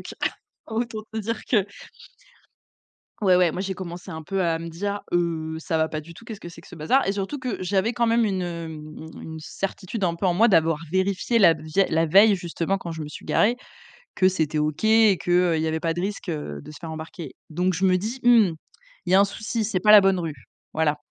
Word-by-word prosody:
donc - - -9 0.5
autant 220 -1 -3
te 220 - -3
dire 230 +2 -4
que 210 -6 +2 1.6
ouais, 190 -3 +5
ouais, 180 -2 +4
moi, 185 - -4
j'ai 195 0 -3
commencé 180 0 -8
un 160 -1 -6
peu 190 +4 -2
à 165 -1 +1
me 165 +1 -6
dire: 200 +5 -3
«Heu, 165 -2 -1
ça 160 0 -2
va 160 - +1
pas 155 -1 -5
du 170 +3 -12
tout, 230 +7 -15
qu'est 225 - -6
ce 205 - -14
que 175 - -9
c'est 170 - -13
que - - -17
ce - - -11
bazar?» 165 - +1
et - - +2
surtout 200 +8 -4
que 255 -4 -3
j'avais 195 +5 0
quand 235 0 +1
même 230 0 +3
une, 190 -3 -1
hem, 160 -2 -7
une 160 0 -7
certitude 190 +4 -4
un 170 -2 +1
peu 180 +3 -2
en 175 - +2
moi, 225 +6 +5
d'avoir 165 -5 +3 0.2
vérifié 195 +5 +1
la 180 -6 +6
vieil 160 +6 0
la 165 0 +2
veille, 200 +6 +6
justement, 175 +1 -2
quand 175 -3 -6
je 160 - -7
me 150 - -6
suis - - -10
garée, 230 +4 +2 0.6
que 185 - +4
c'était 160 -4 -1
OK 150 +4 -1
et 220 -3 +5
qu'il 175 -2 +2
y 160 - -1
avait 160 0 -1
pas 165 -1 -1
de 175 - -3
risque, 200 0 -4
heu, 150 - -4
de - - -12
se 150 - -11
faire 165 -2 -7
embarquer, 160 0 -8 0.2
donc 180 +4 0
je 185 +3 +1
me 185 -1 +4
dis: 220 +8 -4
«Mmh, 235 -6 +6 0.6
il 180 - 0
y - - +6
a 195 - +7
un - - +6
souci, 215 +2 -3
c'est 200 -4 -1
pas 210 - +5
la 210 -2 +10
bonne 195 -1 +3
rue». 165 -3 -4 0.4
Voilà. 155 -2 +1
180 Hz, 240 wpm, -24 LUFS, 160-205 Hz, 1.6 s, la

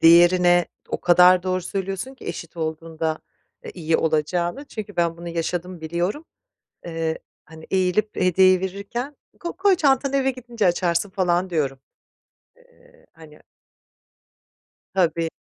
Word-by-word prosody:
diğerine 175 +1 +6 0.2
o - - -3
kadar 180 +1 +6
doğru 185 0 -1
söylüyorsun 195 +7 -4
ki 265 - -15
eşit 170 0 -6
olduğunda, 160 0 -3 0.5
eee, - - -6
iyi 165 -2 +1
olacağını. 170 - 0
Çünkü 215 -7 -8
ben 170 -1 +1
bunu 170 0 -8
yaşadım 170 +1 -3
biliyorum, 175 - -2 0.6
eee, 165 -1 -2 0.3
hani, 160 0 -13
eğilip 190 +3 +1
hediyeyi 185 0 +4
verirken 200 +9 -5 0.2
ko 345 - -4
koy 390 -1 +3
çantanı 275 -3 +2
eve 270 -1 +2
gidince 240 -4 -2
açarsın 175 +1 +1
falan 185 -1 0
diyorum. 140 -5 -1 0.8
Eee, - - -24
hani 155 -2 -16 1.5
Tabii. 170 -3 +1
180 Hz, 125 wpm, -23 LUFS, 165-205 Hz, 1.5 s, diğerine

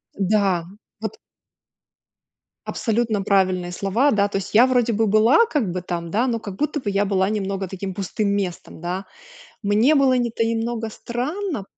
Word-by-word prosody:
Да, 195 -3 +1 0.4
вот. 440 - -4 1.5
Абсолютно 225 -3 0
правильные 185 -3 +1
слова. 210 +10 +1
Да, 200 -1 +2
то 200 - -3
есть, 195 +2 -5
я 240 +4 +7
вроде 245 -2 +2
бы 220 +1 +1
была 225 - +5
как 265 - -1
бы 180 0 -3
там, 170 -1 -4
да, 230 +7 +1
но 230 -2 0
как 200 -4 -8
будто 300 0 -1
бы 205 - -2
я 200 +1 +1
была 195 -1 +1
немного 195 -2 -2
таким 190 +1 -5
пустым 200 +2 -2
местом, 190 -5 -3
да? 180 +3 -3 0.6
Мне 215 +9 +3
было 275 -3 +4
не 240 -2 +1
то 225 - -1
немного 225 0 -2
странно, 270 - -4
210 Hz, 170 wpm, -22 LUFS, 195-240 Hz, 1.5 s, я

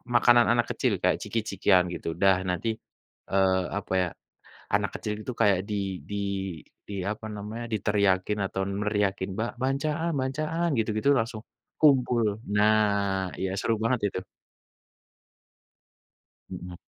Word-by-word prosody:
makanan 120 0 +6
anak 120 -1 +3
kecil - - +1
kayak - - +3
ciki-cikian 100 -5 +2
gitu. - - -6
Dah 95 -1 +5
nanti, 90 +6 -1 0.6
eee, 95 -1 +3
apa 100 -1 -4
ya, 90 - +1 0.7
anak - - +2
kecil 105 - -3
itu 125 - -4
kayak 100 -3 +5
di 105 - -2 0.4
di 100 - -2 0.7
di 100 - -5 0.2
apa 110 +1 -9
namanya, 110 +3 -6
diteriakin 100 -1 +1
atau 95 0 -3
neriakin, 100 -1 -1 0.3
"Bancaan 150 +5 0
bancaan!" 155 +6 -1
gitu-gitu 110 +4 +1
langsung 115 -1 -2 0.4
kumpul. 125 -5 +4 0.3
Nah 100 -3 +2
ya 95 - -1
seru 115 - +1
banget 120 +1 +1
itu. 95 - -4 2.3
Hmm. 90 -1 -7
105 Hz, 120 wpm, -27 LUFS, 95-120 Hz, 2.3 s, makanan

